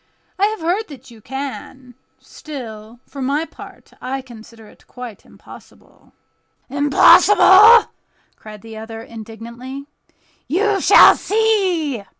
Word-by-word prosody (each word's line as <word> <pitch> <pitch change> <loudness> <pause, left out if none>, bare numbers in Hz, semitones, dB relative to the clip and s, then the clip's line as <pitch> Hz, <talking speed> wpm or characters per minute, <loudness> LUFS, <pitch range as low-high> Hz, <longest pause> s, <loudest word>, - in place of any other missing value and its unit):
I 400 - +3
have 435 -2 -6
heard 365 +7 -2
that 265 -4 -14
you 225 -2 -17
can; 265 0 -9 0.2
still, 230 -6 -11
for 280 - -10
my 285 +5 -2
part, - - -15
I 265 +1 -5
consider 230 -2 -15
it - - -22
quite 245 -4 -11
impossible." - - -19 0.6
"Impossible!" 390 - +5 0.4
cried 215 -1 -14
the 225 -1 -11
other, 225 +1 -9
indignantly. 235 +5 -11 0.6
"You 400 +4 0
shall - - +6
see!" 375 - -1
265 Hz, 115 wpm, -18 LUFS, 230-350 Hz, 0.6 s, shall